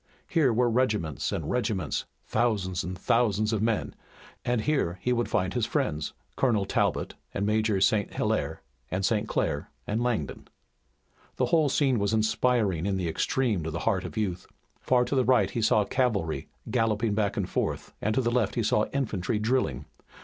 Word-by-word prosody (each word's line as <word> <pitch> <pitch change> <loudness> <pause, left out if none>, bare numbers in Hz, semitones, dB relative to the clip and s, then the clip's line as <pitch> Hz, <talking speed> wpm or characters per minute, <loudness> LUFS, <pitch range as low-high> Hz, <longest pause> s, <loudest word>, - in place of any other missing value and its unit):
Here 160 -8 +3
were 120 +2 +3
regiments 110 - 0
and 80 - -3
regiments, 105 -9 -1 0.2
thousands 105 -6 0
and 90 +1 -5
thousands 110 +1 +2
of 105 - 0
men 115 -1 0 0.5
and 120 -2 +1
here 135 - 0
he 125 - +1
would 120 -1 0
find 90 +1 0
his 120 -3 0
friends, 80 - -1 0.2
Colonel 110 -7 +2
Talbot - - 0 0.2
and 100 - 0
Major 110 -1 +2
St. 100 +1 +2
Hilaire, - - -1 0.3
and 95 +1 -1
St. 110 +1 +1
Clair - - -1 0.2
and 110 +3 -1
Langdon. 120 - -2 0.9
The - - +1
whole 155 -3 +4
scene 135 -4 +2
was 100 +2 +1
inspiring 110 -5 +1
in 100 -1 0
the 90 -2 -1
extreme 110 +4 0
to 80 - -3
the 85 +3 -4
heart 95 -5 +1
of - - -7
youth. 90 -4 -2 0.3
Far 125 -1 +2
to - - -3
the 130 -2 +3
right 115 -6 +3
he 115 - -2
saw 105 -1 +3
cavalry 105 - 0 0.2
galloping 115 -2 +1
back 105 -2 0
and - - 0
forth, - - -2
and 110 +1 0
to 130 - +3
the 120 -1 0
left 120 -5 +1
he 115 - +1
saw 105 0 +2
infantry 110 -7 -1
drilling. 105 - 0
110 Hz, 180 wpm, -27 LUFS, 95-125 Hz, 0.9 s, whole